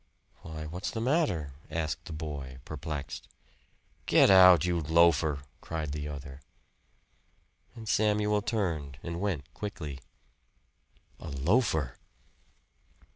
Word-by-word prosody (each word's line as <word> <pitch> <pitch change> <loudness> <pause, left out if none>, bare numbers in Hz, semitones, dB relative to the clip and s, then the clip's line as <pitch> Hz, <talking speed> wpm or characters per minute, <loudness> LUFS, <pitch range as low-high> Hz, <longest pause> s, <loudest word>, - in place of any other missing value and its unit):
"Why, 80 -1 -7
what's 90 +5 -4
the 115 - -4
matter?" 115 - +1 0.2
asked 80 -2 -3
the - - -8
boy 75 -5 -6
perplexed. 70 -3 -6 0.8
"Get - - +6
out, 90 -3 +8
you 90 -1 +1
loafer!" 80 -2 +3 0.2
cried 80 -3 -4
the 75 0 -4
other. 70 -1 -8 1.3
And 115 -2 -9
Samuel 105 0 +2
turned 85 - -2
and 85 +1 -4
went 80 -7 -3
quickly. 85 -10 -6 1.2
A - - -7
loafer! 75 - +1
80 Hz, 105 wpm, -30 LUFS, 75-95 Hz, 1.3 s, out